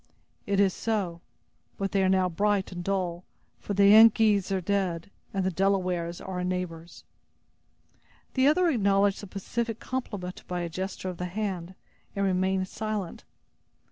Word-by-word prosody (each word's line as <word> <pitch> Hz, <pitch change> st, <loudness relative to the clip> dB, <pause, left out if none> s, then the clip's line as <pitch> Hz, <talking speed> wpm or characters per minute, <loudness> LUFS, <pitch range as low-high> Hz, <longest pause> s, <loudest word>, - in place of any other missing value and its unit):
"It 200 Hz, -1 st, +1 dB
is 195 Hz, -2 st, +4 dB
so; 195 Hz, -7 st, -2 dB, 0.6 s
but 195 Hz, -1 st, -2 dB
they 195 Hz, -, +2 dB
are 190 Hz, -, +3 dB
now 190 Hz, -1 st, +3 dB
bright 200 Hz, +2 st, 0 dB
and 175 Hz, -1 st, -6 dB
dull; 180 Hz, -2 st, -2 dB, 0.4 s
for 205 Hz, -, -4 dB
the 200 Hz, 0 st, +6 dB
Yengeese 215 Hz, -2 st, +6 dB
are 190 Hz, -, +1 dB
dead, 185 Hz, -2 st, -1 dB, 0.2 s
and 195 Hz, -1 st, -1 dB
the 190 Hz, -, 0 dB
Delawares 180 Hz, -2 st, 0 dB
are 190 Hz, -1 st, -6 dB
our -, -, -2 dB
neighbors." 180 Hz, -2 st, -4 dB, 1.3 s
The 260 Hz, 0 st, +3 dB
other 350 Hz, +5 st, +4 dB
acknowledged 200 Hz, -, +2 dB
the 205 Hz, -, -8 dB
pacific 225 Hz, +4 st, -3 dB
compliment 205 Hz, -8 st, -5 dB
by 180 Hz, -1 st, -3 dB
a 170 Hz, -, -3 dB
gesture 185 Hz, +2 st, -4 dB
of 180 Hz, -, -6 dB
the 180 Hz, -, -3 dB
hand, 185 Hz, -2 st, -4 dB, 0.4 s
and 200 Hz, 0 st, 0 dB
remained 190 Hz, 0 st, +1 dB
silent. 210 Hz, -4 st, -4 dB
190 Hz, 155 wpm, -27 LUFS, 180-205 Hz, 1.3 s, the